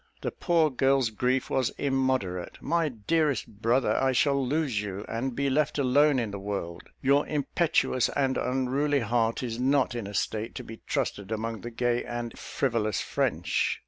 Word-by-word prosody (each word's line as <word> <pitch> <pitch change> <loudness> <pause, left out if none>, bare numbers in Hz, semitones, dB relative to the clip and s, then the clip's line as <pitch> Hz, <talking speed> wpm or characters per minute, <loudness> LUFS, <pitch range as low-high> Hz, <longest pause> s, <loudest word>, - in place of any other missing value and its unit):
The - - -2
poor 165 -3 +2
girl's 135 -2 +2
grief 125 +4 0
was 130 -3 +2
immoderate. 130 -10 -1
"My 165 -2 +1
dearest 145 +3 0 0.2
brother, 120 +4 +2
I 135 0 +2
shall 140 +1 +2
lose 135 -5 0
you, 100 0 -5
and 120 +2 -3
be 140 0 0
left 150 +2 +1
alone 140 +1 +4
in 115 -4 -1
the 100 - -5
world. 95 -4 -5
Your 140 +2 +3
impetuous 150 -3 +1
and 135 -2 0
unruly 135 +3 +1
heart 115 +1 0
is 115 -1 -3
not 135 0 +2
in 115 -4 -4
a 100 - -7
state 110 +4 -2
to - - -5
be 115 0 -10
trusted 100 +1 -2
among 110 0 -3
the 120 - -5
gay 120 +1 0
and 120 -1 -5
frivolous 115 -6 -1
French. - - 0
125 Hz, 170 wpm, -28 LUFS, 115-140 Hz, 0.2 s, alone